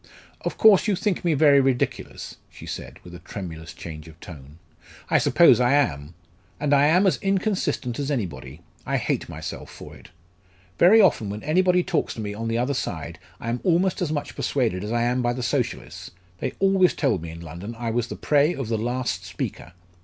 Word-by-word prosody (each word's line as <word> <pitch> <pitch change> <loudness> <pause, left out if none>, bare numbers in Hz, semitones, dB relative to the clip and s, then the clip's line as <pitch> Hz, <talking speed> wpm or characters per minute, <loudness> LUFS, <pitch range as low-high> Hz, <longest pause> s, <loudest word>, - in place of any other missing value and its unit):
"Of - - -4
course, 215 -1 +6
you 205 - +2
think 195 0 -1
me 170 -3 +2
very 145 -1 +6
ridiculous," 130 -2 -2
she - - -12
said, - - -7
with 90 - -12
a 90 - -9
tremulous 85 -2 -8
change 75 -2 -9
of 80 0 -15
tone. 75 -3 -12 0.5
"I - - +5
suppose 165 -9 +5
I 125 +2 +3
am. 80 - 0 0.4
And 145 -1 +1
I 140 +1 +5
am 180 +6 +4
as 190 - +2
inconsistent 195 - -1
as 140 0 -2
anybody 80 - -4 0.2
I - - -1
hate - - -2
myself - - -7
for - - -11
it. - - -16 0.7
Very 195 +6 +7
often 150 - +3
when 105 +1 -6
anybody 180 +3 +3
talks 180 -3 -1
to - - -8
me 105 -1 -4
on 115 +2 -5
the 115 0 0
other 125 +4 0
side, - - -4 0.2
I 115 - -5
am 120 +1 -1
almost 180 +1 +1
as 165 -4 -1
much 145 -2 -4
persuaded 115 -9 -1
as 105 - -4
I 120 0 +1
am 125 +1 +1
by 120 0 0
the 125 0 -5
Socialists: 120 - -3 0.3
they 130 - -3
always 195 -2 +3
told 135 - 0
me 85 - -7
in 85 +1 -9
London 85 +8 -8
I 115 -1 -3
was 120 0 -1
the - - -6
prey 150 +3 +2
of 135 -5 -5
the 110 -2 0
last 120 -5 -2
speaker. 90 -2 -6
125 Hz, 205 wpm, -24 LUFS, -, 0.7 s, Very